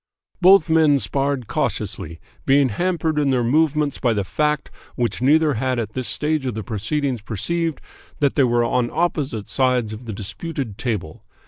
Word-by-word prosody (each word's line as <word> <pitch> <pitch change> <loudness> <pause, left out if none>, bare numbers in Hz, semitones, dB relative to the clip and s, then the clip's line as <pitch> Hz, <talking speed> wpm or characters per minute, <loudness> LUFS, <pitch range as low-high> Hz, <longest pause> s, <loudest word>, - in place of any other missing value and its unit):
Both 185 -2 +7
men 160 -3 +4
sparred 135 -1 -1
cautiously, 85 -4 -3 0.2
being 135 -1 +4
hampered 160 - -1
in 145 -2 +2
their 125 -2 +2
movements 150 +2 +1
by 120 -3 +2
the 100 -2 -1
fact, 150 +8 -1 0.2
which 120 -3 -1
neither 150 +3 +4
had 130 +2 -1
at 110 -3 -3
this 130 -2 -2
stage 155 -1 0
of 125 - -3
the 110 - -4
proceedings 120 +5 -2
perceived, 165 - -2 0.4
that 140 -2 +2
they 140 - +3
were 120 -1 +2
on 120 0 0
opposite 150 -10 -1
sides 125 -4 +1
of 110 +3 -9
the 110 - -5
disputed 115 - -5
table. 105 -11 -4
135 Hz, 165 wpm, -21 LUFS, 115-150 Hz, 0.4 s, Both